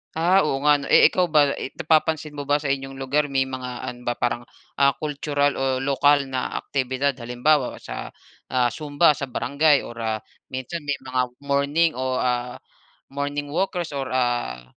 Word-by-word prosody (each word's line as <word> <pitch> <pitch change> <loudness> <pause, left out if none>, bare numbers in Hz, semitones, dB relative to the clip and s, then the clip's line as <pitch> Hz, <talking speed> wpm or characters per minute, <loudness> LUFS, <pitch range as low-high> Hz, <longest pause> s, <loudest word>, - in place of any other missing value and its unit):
Ah, 175 +4 +4
oo 135 +1 -1
nga 150 -1 +5
'no, 140 - -6
eh, - - +6
ikaw 180 -1 +2
ba 150 -3 +4
eh - - -6
napapansin 155 -1 +1
mo 145 -1 -7
ba 145 - +3
sa 145 -2 0
inyong 135 0 -3
lugar 140 +3 0
may 135 -1 +1
mga 130 -2 -6
ano 120 - -6
ba 120 - +1
parang, 120 0 -2 0.3
ah, 140 0 +4
cultural 145 -1 0
o 135 0 0
lokal 140 +1 +3
na 130 -1 -2
aktibidad 135 +1 -1
halimbawa 125 +4 +1
sa, - - -7 0.3
ah, 125 -2 +1
zumba 150 +3 +3
sa 140 -1 -4
barangay 140 +4 +2
or 120 0 -9
ah, 110 -1 -2 0.2
minsan 130 +6 -5
may 145 - +1
mga 130 -1 0 0.2
morning 140 +4 +2
o, 130 0 -1
ah, 125 -1 -1 0.6
morning 145 +1 -3
walkers 175 -1 -1
or 135 -2 -3
ah 120 - -1
140 Hz, 175 wpm, -23 LUFS, 130-145 Hz, 0.6 s, eh